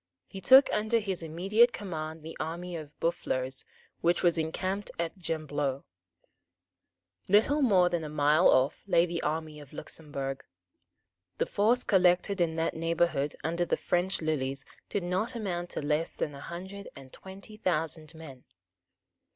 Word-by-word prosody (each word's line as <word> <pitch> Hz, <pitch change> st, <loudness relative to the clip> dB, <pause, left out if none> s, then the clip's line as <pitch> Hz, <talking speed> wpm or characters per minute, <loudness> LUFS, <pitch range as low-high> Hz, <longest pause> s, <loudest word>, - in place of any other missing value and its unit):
He 195 Hz, -, -9 dB
took 265 Hz, +4 st, +8 dB
under 215 Hz, +2 st, +2 dB
his 195 Hz, -5 st, -2 dB
immediate 195 Hz, +9 st, +3 dB
command 160 Hz, -5 st, -5 dB
the 160 Hz, +1 st, -8 dB
army 175 Hz, +2 st, -4 dB
of 155 Hz, -3 st, -9 dB
Boufflers, 130 Hz, -5 st, -1 dB, 0.3 s
which 170 Hz, +1 st, +1 dB
was 175 Hz, -2 st, +4 dB
encamped 185 Hz, +5 st, -2 dB
at 170 Hz, +2 st, -2 dB
Gembloux. 145 Hz, -5 st, -2 dB, 1.4 s
Little 225 Hz, +10 st, +4 dB
more 195 Hz, -9 st, +5 dB
than 175 Hz, -2 st, -1 dB
a 155 Hz, -, -5 dB
mile 150 Hz, 0 st, +4 dB
off 130 Hz, +3 st, +3 dB
lay 170 Hz, -3 st, +4 dB
the 170 Hz, -1 st, -3 dB
army 155 Hz, 0 st, -3 dB
of 145 Hz, -1 st, -13 dB
Luxemburg. 140 Hz, -3 st, -5 dB, 0.9 s
The -, -, +1 dB
force 230 Hz, +5 st, +2 dB
collected 185 Hz, 0 st, +3 dB
in 165 Hz, -2 st, +1 dB
that 165 Hz, 0 st, 0 dB
neighbourhood 165 Hz, -3 st, 0 dB
under 170 Hz, +2 st, 0 dB
the 175 Hz, -, 0 dB
French 180 Hz, 0 st, 0 dB
lilies 135 Hz, -3 st, -1 dB, 0.2 s
did 200 Hz, -, -1 dB
not 185 Hz, +8 st, -1 dB
amount 175 Hz, -6 st, -3 dB
to -, -, -4 dB
less 150 Hz, +2 st, 0 dB
than 150 Hz, -, -2 dB
a 140 Hz, -, -9 dB
hundred 190 Hz, +5 st, -8 dB
and 135 Hz, -2 st, -13 dB
twenty 195 Hz, +3 st, -11 dB
thousand 160 Hz, -4 st, -2 dB
men. 140 Hz, -6 st, -11 dB
170 Hz, 150 wpm, -29 LUFS, 155-190 Hz, 1.4 s, took